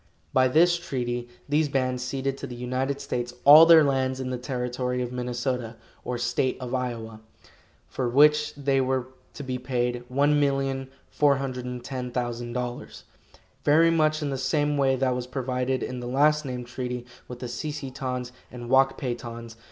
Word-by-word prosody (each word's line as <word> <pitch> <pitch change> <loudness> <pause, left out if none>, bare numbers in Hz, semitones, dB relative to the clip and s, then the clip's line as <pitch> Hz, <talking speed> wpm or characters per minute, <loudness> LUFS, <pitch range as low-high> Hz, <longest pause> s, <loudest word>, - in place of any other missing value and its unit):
By 130 0 +5
this 175 +6 +4
treaty 120 -6 -3 0.2
these 150 +1 +1
bands 130 -2 0
ceded 135 +1 -2
to 140 - -5
the 120 - -8
United 130 +3 -2
States 125 -3 -4
all 155 +3 +10
their 165 -2 +8
lands 130 -2 0
in 130 -1 -3
the 125 - -2
Territory 125 0 -3
of 120 - -5
Minnesota 125 -1 -3 0.3
or 125 - -3
State 120 +2 0
of 125 -1 -6
Iowa, 115 -4 -4 0.7
for 125 -2 -2
which 150 +4 +4
they 140 -1 +1
were 130 -1 -1 0.3
to 145 - -6
be 130 -1 -3
paid 125 -1 -2
$1,410,000, 130 -3 -1 0.6
very 165 +3 +5
much 155 -1 +2
in 145 - -2
the 135 - -3
same 145 +2 +1
way 135 -2 +2
that 130 -1 +1
was 125 0 -4
provided 130 0 -2
in 125 0 -4
the 120 - -6
last 150 +4 +3
named 125 -2 -5
treaty 125 0 -5 0.2
with 125 - -8
the 125 - -6
Si 120 +6 -4
si 145 -3 -6
tons 125 -2 -4 0.2
and 120 -1 -8
Wak 135 0 +4
pay 125 -3 -2
tons. 115 -1 -8
130 Hz, 160 wpm, -26 LUFS, 125-140 Hz, 0.7 s, all